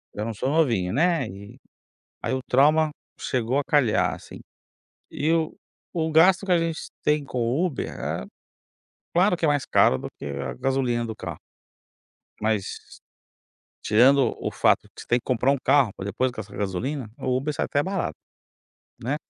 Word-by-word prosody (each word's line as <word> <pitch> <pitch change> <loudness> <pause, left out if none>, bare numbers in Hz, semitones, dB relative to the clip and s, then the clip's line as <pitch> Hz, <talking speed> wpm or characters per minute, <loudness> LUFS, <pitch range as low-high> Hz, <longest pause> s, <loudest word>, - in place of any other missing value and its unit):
já 105 - -3
não 115 - -3
sou 130 +6 -2
novinho, 115 - +1
né. 160 -3 +2
E 100 +7 -11 0.6
aí - - -1
o 130 - -1
trauma 150 +4 +4 0.3
chegou 125 +2 -1
a 145 - 0
calhar, 135 -8 +2
assim. - - -12 0.7
E 155 +3 0
o 160 -2 0 0.4
o 160 -1 0
gasto 180 +5 +5
que 185 - -1
a 175 - +6
gente 165 -1 -2
tem 150 -1 +2
com 130 - -6
o 125 +10 +1
Uber, 155 -8 -3
é - - -4 0.9
claro 180 +2 +4
que 165 -2 0
é - - +3
mais 145 -2 +1
caro 65 - +4
do - - -6
que - - -7
a 70 -2 -4
gasolina 125 - 0
do 110 - -6
carro, 85 -7 -6 1.0
mas, 110 -2 -3 0.9
tirando 125 +3 +4
o - - -2
fato - - +2
que - - -9
você - - -11
tem 120 - +2
que - - -25
comprar 130 +1 +2
um 140 - +2
carro, 135 -5 +4
para 95 - -7
depois 125 +5 0
gastar 105 -4 -8
com - - -7
gasolina, 110 +5 -3
o 130 -1 0
Uber 140 +4 -1
sai - - -1
até 145 0 0
barato, 195 -2 -2 0.9
né. 130 +5 -1
130 Hz, 180 wpm, -25 LUFS, 110-150 Hz, 1.0 s, a